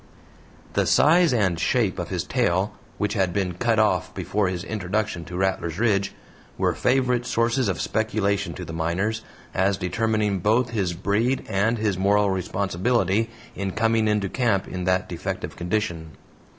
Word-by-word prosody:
The - - +1
size 170 +3 +5
and 95 -8 +1
shape 80 - +1
of - - -4
his - - -2
tail 95 +4 0 0.2
which 105 -1 -1
had 95 -5 +1
been 95 -2 -1
cut 115 +5 +1
off 110 -1 +2
before 105 -1 0
his 90 -1 -3
introduction 100 -4 -2
to 90 +2 -6
Rattlers 95 -3 -1
Ridge 100 -3 +1 0.5
were - - +1
favorite 125 -1 +1
sources 115 +2 +1
of 95 -4 -1
speculation 100 -5 0
to 90 - -6
the 80 - -7
miners, 90 +7 -1 0.3
as 95 +1 +2
determining 105 +1 0
both 115 +6 +2
his 95 -6 -1
breed 105 +9 0
and 110 +3 +1
his 105 -4 -1
moral 100 +1 +3
responsibility 95 +3 0 0.2
in 95 -1 -3
coming 115 0 +2
into 105 -2 +1
camp 110 -3 0
in 90 0 -4
that 95 0 +1
defective 85 - -5
condition. 85 -4 -2
100 Hz, 155 wpm, -24 LUFS, 90-110 Hz, 0.5 s, size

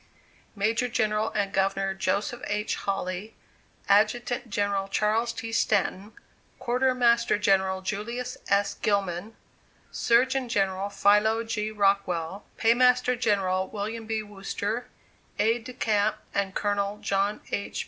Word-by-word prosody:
Major 225 +4 +1
General 215 -2 0
and 200 -1 0
Governor 195 0 +1
Joseph 200 +5 -1
H. 210 +1 -1
Hawley; 195 +1 -3 0.5
Adjutant 230 +4 +2
General 200 -1 0
Charles 215 +4 +1
T. 230 -1 -6
Stanton; 205 -2 0 0.4
Quartermaster 240 -2 +2
General 190 -2 +2
Julius 235 +6 -4
S. 200 0 +2
Gilman; 200 0 -1 0.6
Surgeon 255 +2 +2
General 195 -2 0
Philo 210 +3 +3
G. 215 -2 -2
Rockwell; 195 -3 0
Paymaster 250 +2 +4
General 195 -5 +1
William 220 +2 -5
B. 220 -1 -1
Wooster; 205 +3 -4 0.5
Aides 225 +2 +1
de 255 - -7
Camp 215 -3 +1 0.2
and 195 -1 -1
Colonel 205 0 -1
John 200 +1 -1
H. 200 - -3
210 Hz, 115 wpm, -27 LUFS, 195-230 Hz, 0.6 s, Paymaster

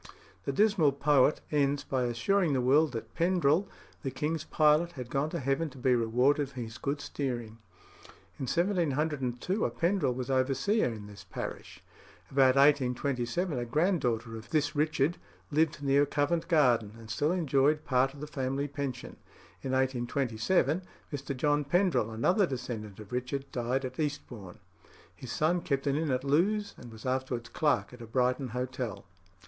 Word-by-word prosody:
The - - 0
dismal 175 -3 +3
poet 145 0 +3
ends 145 -1 +1
by 130 -2 -1
assuring 150 +9 +1
the 130 - +2
world 140 +4 +4
that 115 -1 -6
Pendrell, 175 0 +2 0.3
the 135 - -2
king's 150 +4 -2
pilot, 155 +3 +3
had 125 -2 -8
gone 140 +3 0
to 170 - -3
heaven 140 +4 0
to 140 - -15
be 130 0 +2
rewarded 125 +5 +2
for 130 - -9
his 115 0 -7
good 140 +1 -2
steering. 120 -6 -4 0.8
In 130 - -3
1702 160 - 0
a - - +2
Pendrell 170 -7 0
was 130 +1 -3
overseer 135 - +2
in 110 -4 -5
this 100 -2 -11
parish. 90 - -7 0.5
About 135 -1 +5
1827 140 +2 +2
a 120 - -2
granddaughter 125 - 0
of 110 0 -10
this 155 -2 0
Richard 150 +2 +1 0.3
lived 155 0 +1
near 140 +1 +3
Covent 160 +4 0
Garden, 125 - +3
and 110 -1 -10
still 145 +8 +1
enjoyed 150 -3 +2
part 130 +1 +2
of 145 - -11
the - - -3
family 135 -1 -2
pension. 140 -3 -5 0.4
In 130 - -3
1827 130 +4 +1 0.3
Mr. 140 -1 -4
John 145 +2 +2
Pendrell, 150 - +2
another 175 - +2
descendant 110 - -5
of 105 +1 -11
Richard, 125 +2 -3
died 125 +2 -1
at 130 - -7
Eastbourne. 125 - -4 0.6
His 125 - -8
son 170 +6 +1
kept 140 -3 -1
an 140 -1 +1
inn 155 0 0
at 130 -1 0
Lewes, 200 +9 +1
and 120 - -11
was 110 +2 -12
afterwards 130 -2 -2
clerk 150 -4 0
at 125 - -12
a 115 - -8
Brighton 125 +3 +1
hotel. 125 -4 -4
135 Hz, 160 wpm, -30 LUFS, 125-150 Hz, 0.8 s, About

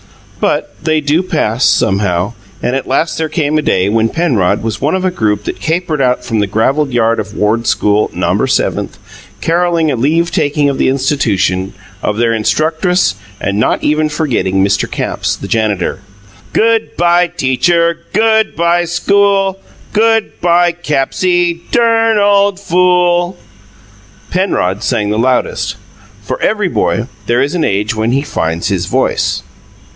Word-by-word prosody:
But - - -1
they 155 -1 +1
do 150 +4 +1
pass, 140 - -1
somehow, 95 0 +1 0.3
and 125 +2 0
at 135 - -3
last 150 +5 0
there 160 -1 -1
came 155 -1 0
a - - 0
day 95 -9 +1
when 115 +1 +1
Penrod 110 - 0
was 110 -1 -3
one 150 +5 +1
of 190 0 -1
a 185 - +1
group 105 - -1
that - - -5
capered 160 -2 -1
out 125 -1 +1
from 115 -2 -1
the 105 - +1
gravelled 135 +8 0
yard 115 -2 +1
of 105 -1 -6
"Ward 110 +3 0
School, 105 +1 +2
Nomber - - 0
Seventh," - - -1 0.4
carolling 170 -2 +1
a - - 0
leave 160 +8 +1
taking 150 -4 +1
of 140 -2 -1
the - - +3
institution, 105 -9 0 0.3
of 105 - -1
their 115 0 +2
instructress, 160 - +1 0.3
and 100 +1 -1
not - - +1
even 155 +1 +1
forgetting 105 - 0
Mr. 100 -1 0
Capps, - - -2
the - - -8
janitor. 105 -3 -1 0.5
"Good 225 0 +1
bye, 175 +1 +3
teacher! 170 +5 +1
Good 220 +1 +2
bye, 170 +1 +2
school! 195 +2 +1 0.3
Good 225 0 +1
bye, 175 0 +3
Cappsie, 175 +2 0
dern 225 -2 +2
ole 200 -1 +3
fool!" 180 -1 +1 0.9
Penrod 105 - 0
sang 105 -1 0
the 105 - -1
loudest. 125 +1 0 0.5
For - - -4
every - - +1
boy, - - 0 0.2
there 120 +1 +2
is 145 +4 -2
an 175 -3 0
age 105 -4 0
when 110 +1 -1
he 140 +1 +1
"finds 80 - -2
his 95 -3 -1
voice." - - 0
150 Hz, 155 wpm, -13 LUFS, 110-175 Hz, 0.9 s, the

